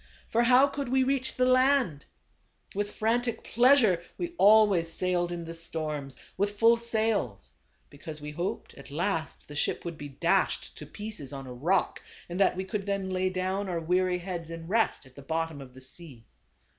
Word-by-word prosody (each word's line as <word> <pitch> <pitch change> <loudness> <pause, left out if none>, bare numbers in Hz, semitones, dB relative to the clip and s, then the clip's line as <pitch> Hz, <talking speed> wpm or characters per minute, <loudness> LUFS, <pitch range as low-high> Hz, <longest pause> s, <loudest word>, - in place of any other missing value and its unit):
For 230 - +3
how 250 +3 +6
could 280 -2 -4
we 260 +1 +3
reach 260 0 -1
the 255 - +2
land? 255 - +3 0.7
With 205 +1 -2
frantic 230 +1 0
pleasure 240 -7 +4 0.2
we 345 -1 -4
always 200 -5 +5
sailed 175 0 0
in 170 -1 -5
the 165 - -6
storms, 155 -5 -4 0.2
with 205 +1 -1
full 230 +2 +6
sails; 220 - -1 0.4
be 145 - -15
cause 155 0 -7
we 150 0 -7
hoped 175 +5 -4
at 140 - -13
last, 160 +2 -2
the 150 - -10
ship 150 - -1
would 170 -2 -5
be 145 - -6
dashed 135 - 0
to - - -9
pieces 205 -10 -6
on 135 -1 -7
a 125 - -8
rock, 160 +10 0 0.3
and 175 +2 -5
that 195 - +4
we 190 - -2
could 195 +1 -4
then 195 -1 -1
lay 185 0 +1
down 185 +2 -2
our 175 -2 -1
weary 180 +2 +1
heads 175 -2 -5
in 165 0 -7
rest, 225 -5 +1
at 130 - -18
the 140 - -10
bottom 160 +1 -3
of 130 -2 -12
the 130 - -12
sea. 130 -3 -10
185 Hz, 190 wpm, -28 LUFS, 160-220 Hz, 0.7 s, how